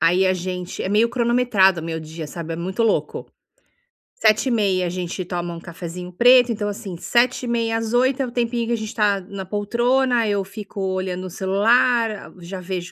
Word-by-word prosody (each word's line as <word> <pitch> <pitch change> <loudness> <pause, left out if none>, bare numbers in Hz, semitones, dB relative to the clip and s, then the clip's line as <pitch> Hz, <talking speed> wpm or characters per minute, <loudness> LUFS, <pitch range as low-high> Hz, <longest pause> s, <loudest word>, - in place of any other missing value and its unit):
aí 180 +3 +3
a 185 - +3
gente 180 0 -4
é - - -2
meio 215 +4 +3
cronometrado 235 -7 +3
o - - -7
meu 165 -1 -4
dia, 160 0 -7
sabe, 165 +2 -6
é - - -6
muito 185 +7 -2
louco. 225 - 0 0.9
07:30, 215 -4 +2
a - - -2
gente 180 +1 -4
toma 175 -1 -4
um 170 - -7
cafezinho 175 +1 -8
preto, 245 +5 +6
então, 210 -2 -2
assim, 200 -3 -6
07:30 235 +1 +1
às 225 0 -3
08:00 255 +2 +2
é - - -1
o 245 - -7
tempinho 235 -1 -1
que 235 - 0
a 235 - +1
gente 220 +1 -6
tá 205 -3 +2
na 190 +1 -7
poltrona, 235 +4 +1
eu 200 -1 0
fico 200 +1 -9
olhando 185 -1 -2
o - - -7
celular, 225 +6 +2
ah, 210 - -9
já 180 +2 -7
vejo 180 -1 -5
200 Hz, 195 wpm, -22 LUFS, 180-235 Hz, 0.9 s, preto